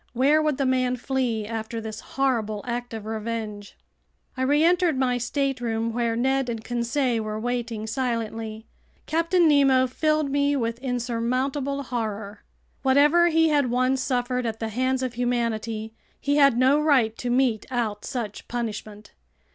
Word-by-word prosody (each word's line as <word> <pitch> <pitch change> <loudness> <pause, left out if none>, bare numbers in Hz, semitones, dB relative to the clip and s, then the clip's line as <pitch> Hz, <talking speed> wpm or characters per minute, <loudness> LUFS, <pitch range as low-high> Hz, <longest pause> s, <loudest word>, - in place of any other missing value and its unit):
Where 280 +5 +4
would 305 -3 0
the 275 - 0
man 255 -1 +1
flee 245 -4 -1
after 225 +1 -4
this 220 -1 -6
horrible 225 -6 -1
act 245 0 -3
of 220 -2 -6
revenge? 220 -2 -5 0.6
I 260 - -4
reentered 320 +3 +3
my 250 -2 +1
stateroom, 240 -4 -1
where 235 -1 0
Ned 265 +2 +1
and 225 -2 -4
Conseil 240 0 0
were 215 0 -4
waiting 235 -2 -3
silently. 225 -2 -3 0.4
Captain 335 +2 +2
Nemo 270 -3 +5
filled 305 +2 0
me 285 0 +2
with 230 -3 -2
insurmountable 255 +3 -1
horror. 220 -4 -4 0.4
Whatever 295 +6 +5
he 325 -1 +3
had 285 -4 +2
once 255 +2 +1
suffered 250 -1 -1
at 225 0 -4
the 225 - -3
hands 255 +3 0
of 255 -2 -2
humanity, 230 -2 -2 0.3
he 285 +1 +1
had 275 -4 +5
no 265 +4 +4
right 265 -8 +3
to 245 - -3
mete 245 -3 +1
out 225 -5 -2
such 230 -6 -5
punishment. 215 -3 -5
245 Hz, 145 wpm, -25 LUFS, 225-270 Hz, 0.6 s, Nemo